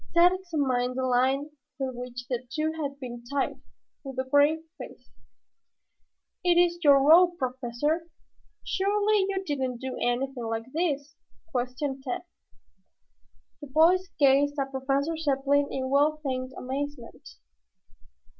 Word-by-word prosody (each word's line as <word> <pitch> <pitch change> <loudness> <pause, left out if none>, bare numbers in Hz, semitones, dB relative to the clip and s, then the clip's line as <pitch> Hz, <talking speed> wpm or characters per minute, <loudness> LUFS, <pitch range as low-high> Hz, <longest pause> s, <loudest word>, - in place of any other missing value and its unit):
Tad 345 +1 +7
examined 280 -9 -1
the 260 - -1
line 260 +4 +1 0.3
with 265 -2 -3
which 245 0 -7
the 250 -1 -3
two 310 0 -1
had 285 -3 -5
been 240 -2 -7
tied, 275 +3 -2 0.4
with 270 -2 -8
a 260 0 -2
grave 290 +4 +3 0.2
face. - - -11 1.3
"It 355 -1 +4
is 345 0 +3
your 285 -2 +7
rope, 345 +2 +6
Professor. 260 +5 -2 0.6
Surely, 410 +1 +1
you 390 -1 -2
didn't 265 -5 -2
do 260 0 -5
anything 245 0 -1
like 225 0 -3
this?" 300 -3 -1 0.4
questioned 260 +2 -3
Tad. 250 +4 -3 1.4
The 290 - -8
boys 340 +6 +3
gazed 285 +1 +4
at 270 0 -2
Professor 275 +4 -1
Zepplin 285 -2 +1
in 260 0 -3
well 295 +2 +3
feigned 255 -1 -3
amazement. 265 - -6
275 Hz, 125 wpm, -27 LUFS, 255-315 Hz, 1.4 s, Tad